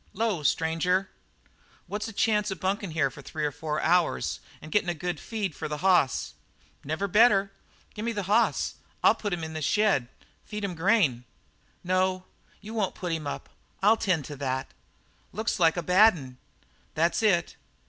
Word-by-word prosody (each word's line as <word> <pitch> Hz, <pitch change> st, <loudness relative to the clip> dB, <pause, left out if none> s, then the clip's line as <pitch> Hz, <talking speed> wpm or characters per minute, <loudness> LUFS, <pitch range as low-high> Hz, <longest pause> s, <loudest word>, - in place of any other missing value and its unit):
"'Lo, 215 Hz, -5 st, 0 dB
stranger." 165 Hz, +6 st, +1 dB, 0.7 s
"What's 210 Hz, +2 st, -4 dB
the -, -, -6 dB
chance 210 Hz, 0 st, +1 dB
of 190 Hz, -, -5 dB
bunking 195 Hz, +1 st, -1 dB
here 155 Hz, -4 st, 0 dB
for 140 Hz, -, -11 dB
three 150 Hz, +2 st, -4 dB
or 145 Hz, -, 0 dB
four 150 Hz, +1 st, -3 dB
hours 175 Hz, +1 st, +1 dB, 0.2 s
and 155 Hz, -, -11 dB
gettin' 205 Hz, -4 st, +2 dB
a 175 Hz, -, -1 dB
good 175 Hz, 0 st, -3 dB
feed 210 Hz, -7 st, -3 dB
for -, -, -5 dB
the 150 Hz, 0 st, -4 dB
hoss?" 180 Hz, -8 st, +3 dB, 0.5 s
"Never 155 Hz, +7 st, -2 dB
better. 200 Hz, -1 st, +4 dB, 0.4 s
Gimme 225 Hz, +3 st, -3 dB
the 205 Hz, -3 st, -3 dB
hoss; 210 Hz, +5 st, +1 dB, 0.3 s
I'll -, -, +7 dB
put 205 Hz, -, -4 dB
him 175 Hz, -2 st, -2 dB
up -, -, -3 dB
in 160 Hz, -, -7 dB
the 155 Hz, -, -4 dB
shed. 190 Hz, -, +2 dB, 0.4 s
Feed 210 Hz, 0 st, -6 dB
him 195 Hz, -2 st, -2 dB
grain?" 165 Hz, -, +2 dB, 0.6 s
"No, 185 Hz, 0 st, +1 dB, 0.4 s
you 215 Hz, +2 st, -9 dB
won't 210 Hz, -4 st, -1 dB
put 180 Hz, -2 st, -4 dB
him 160 Hz, -3 st, -3 dB
up. -, -, -5 dB, 0.3 s
I'll 215 Hz, +3 st, +6 dB
tend 185 Hz, -10 st, 0 dB
to 145 Hz, -, -7 dB
that." 130 Hz, -1 st, -3 dB, 0.6 s
"Looks 220 Hz, 0 st, -2 dB
like 165 Hz, 0 st, +4 dB
a 175 Hz, -, -1 dB
bad 190 Hz, +5 st, +6 dB
'un." 130 Hz, -3 st, -10 dB, 0.6 s
"That's 165 Hz, +6 st, +2 dB
it." 190 Hz, -6 st, +2 dB
180 Hz, 180 wpm, -27 LUFS, 155-205 Hz, 0.7 s, I'll